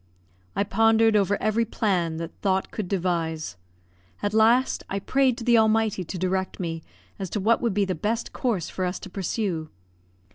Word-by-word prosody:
I - - +2
pondered 225 +2 +3
over 205 0 +2
every 215 +2 +1
plan 185 -7 0
that 165 0 -5
thought 190 -1 0
could 210 -4 -4
devise; 165 - -1 0.7
at 205 - 0
last, 230 +4 +4
I 195 - -2
prayed 260 +4 +2
to - - -6
the 235 -1 +5
Almighty 220 -3 +2
to 180 +2 -6
direct 185 +1 -1
me 165 -3 -3 0.4
as 190 -2 -4
to 210 - -2
what 225 +4 +2
would 230 -5 0
be 205 -1 +2
the 190 - -1
best 215 +7 -2
course 220 - -1
for 185 - -4
us 180 +1 -2
to 195 - -10
pursue. 185 -4 -2
200 Hz, 180 wpm, -25 LUFS, 180-225 Hz, 0.7 s, the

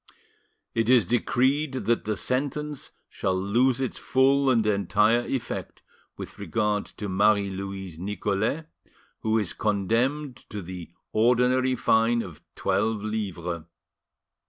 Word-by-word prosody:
"It 115 0 +1
is 125 -4 +6
decreed 130 +5 +1
that 120 -2 0
the 105 -1 -1
sentence 145 +4 -1 0.2
shall 95 -1 -1
lose 120 +7 +2
its 130 -2 -2
full 135 +1 +3
and 115 -4 +3
entire 105 +2 +3
effect 125 0 -4 0.3
with - - -8
regard 105 -2 0
to 105 - -4
Marie 100 +1 +3
Louise 95 -3 -6
Nicolais, 105 - -1 0.6
who 110 0 +1
is 105 -5 -1
condemned 120 +7 0
to 105 -2 -5
the 90 -1 -8 0.2
ordinary 125 +3 +3
fine 115 0 +3
of 85 -5 -10
twelve 110 -1 0
livres. 90 -6 -3
110 Hz, 120 wpm, -26 LUFS, 100-130 Hz, 0.6 s, is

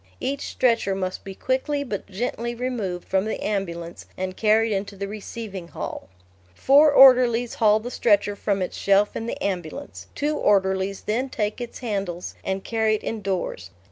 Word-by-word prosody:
Each 280 +1 -3
stretcher 230 -6 +1
must 185 -1 -3
be 195 -1 -8
quickly 285 +5 -1
but 210 -8 -5
gently 235 +3 -3
removed 230 -8 -3
from 190 +1 +1
the 220 - -3
ambulance 170 -5 -4
and 185 0 -3
carried 220 +2 +3
into 200 +1 -3
the 200 0 -4
receiving 205 -3 -7
hall. 95 - -6 0.5
Four 290 - +6
orderlies 250 -3 +6
haul 215 -1 +4
the 240 +3 -7
stretcher 205 -3 +2
from 200 -1 -1
its 180 - -5
shelf 200 +1 +2
in 225 - -4
the - - -4
ambulance; 190 - -4
two 295 +1 0
orderlies 190 -1 +1
then 245 +5 -1
take 210 0 -2
its 240 +1 -7
handles 195 -5 -3
and 190 0 -2
carry 220 -1 +1
it - - -6
indoors. 190 - -3
210 Hz, 165 wpm, -24 LUFS, 190-235 Hz, 0.5 s, Four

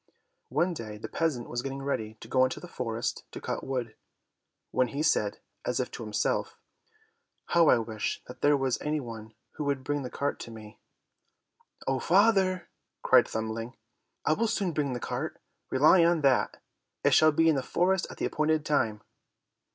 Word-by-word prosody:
One 175 +1 +1
day 110 -8 -7
the 105 - -6
peasant 150 -8 -1
was 120 - -3
getting 135 +1 -5
ready 110 -6 -2
to - - -9
go 130 +2 +3
into 130 - 0
the 180 - -9
forest 115 -7 -3
to - - -7
cut - - -4
wood, 125 -4 -3 0.8
when 130 - +2
he 140 +5 -3
said 105 -9 +2 0.3
as - - -1
if - - -2
to - - -7
himself, 110 -1 -1 0.9
"How 170 -3 +5
I - - +6
wish 110 -2 -3
that 125 - -11
there 145 0 +5
was 135 -2 0
any 150 +1 0
one 110 -4 -8 0.2
who 150 - -5
would 140 -2 -1
bring 145 +1 -1
the 125 - -5
cart 140 +3 -2
to - - -7
me!" 110 -2 -11 1.1
"Oh 135 -1 0
father," 190 - +3 0.4
cried - - +6
Thumbling, 110 +2 -4 0.5
"I 155 - +4
will 230 +8 +1
soon 195 -4 0
bring 145 -3 0
the 125 - -3
cart, - - -4 0.3
rely 155 +6 +6
on 170 -1 +3
that; 135 -3 +2 0.4
it - - +4
shall 155 0 +6
be 165 +2 +3
in 160 - +5
the 135 - 0
forest 180 +7 +1
at - - -10
the - - -1
appointed 155 0 +1
time." 110 -8 0
135 Hz, 180 wpm, -29 LUFS, 115-155 Hz, 1.1 s, I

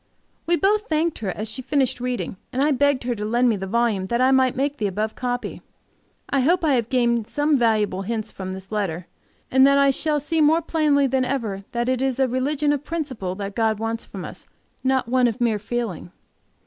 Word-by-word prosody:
We 345 - +4
both 415 +4 +1
thanked 320 +1 0
her 205 - -3
as 215 +4 -4
she 260 - -5
finished 260 -1 0
reading, 245 -5 -3
and 265 +2 0
I 300 - +3
begged 285 -1 +2
her 245 0 -1
to 210 -2 -5
lend 240 +3 +2
me 225 - +2
the 195 -1 -5
volume 215 -3 0
that 235 +4 0
I 260 +1 +4
might 260 -1 +3
make 280 +2 -1
the 210 - 0
above 210 +3 -2
copy. 245 -1 -4 0.7
I 275 - +1
hope 335 +6 +2
I 295 - +3
have 235 -3 0
gained 235 -3 +1
some 295 +1 +1
valuable 215 -5 +1
hints 220 +2 -3
from 185 -1 -6
this 190 +1 -11
letter, 185 -5 -2 0.5
and 265 - +4
that 280 0 +4
I 280 0 +5
shall 300 +2 0
see 315 +3 0
more 320 +3 +4
plainly 300 -3 +2
than 265 0 +1
ever 220 -7 -3
that 240 0 -1
it 255 0 0
is 265 -1 0
a 265 - +3
religion 285 +4 0
of 290 -1 -3
principle 275 - -4
that 200 0 -5
God 220 -1 +1
wants 225 +1 -3
from 190 -3 -8
us, - - -9 0.4
not 260 -2 +1
one 250 0 +3
of 230 +1 -3
mere 230 -3 +1
feeling. 215 -5 -4
250 Hz, 220 wpm, -23 LUFS, 215-280 Hz, 0.7 s, I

